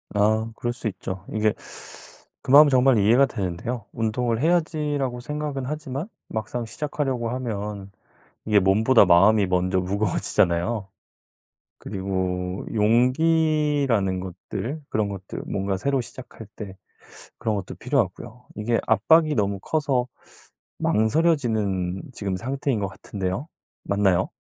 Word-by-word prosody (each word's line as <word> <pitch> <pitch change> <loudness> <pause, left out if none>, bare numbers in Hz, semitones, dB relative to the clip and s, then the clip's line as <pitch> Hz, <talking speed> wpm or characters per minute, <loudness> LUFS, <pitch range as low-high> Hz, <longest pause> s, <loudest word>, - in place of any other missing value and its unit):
아 110 +2 +2
그럴 120 +1 -2
수 120 - -4
있죠. 95 -2 -5
이게 110 -1 +1 0.9
그 - - -4
마음은 145 +2 +9
정말 130 -2 +4
이해가 115 +7 +5
되는데요. 105 +3 -4
'운동을 115 +1 -1
해야지.'라고 150 -6 0
생각은 150 +1 -4
하지만 150 +2 -4 0.2
막상 110 +2 -3
시작하려고 130 -1 -2
하면 105 -5 -4 0.5
이게 105 -1 +4
몸보다 110 +5 +5
마음이 100 +4 +5
먼저 90 +1 +1
무거워지잖아요. 95 +1 0 0.9
그리고 95 -2 -3
용기라는 130 - +2
것들 100 - -6
그런 105 -2 0
것들 100 -1 -7
뭔가 95 0 -1
새로 135 +6 0
시작할 120 -2 -10
때 100 -3 -8 0.6
그런 110 - -1
것도 100 - -5
필요하고요. 125 +2 -2
이게 115 +2 0
압박이 155 +9 +4
너무 100 -4 0
커서 135 -2 0 0.7
망설여지는 110 - +1
지금 100 -4 -3
상태인 135 +2 -2
것 100 - -1
같은데요. 95 +5 -4 0.4
맞나요? 100 -3 +2
110 Hz, 290 characters per minute, -24 LUFS, 100-135 Hz, 0.9 s, 마음은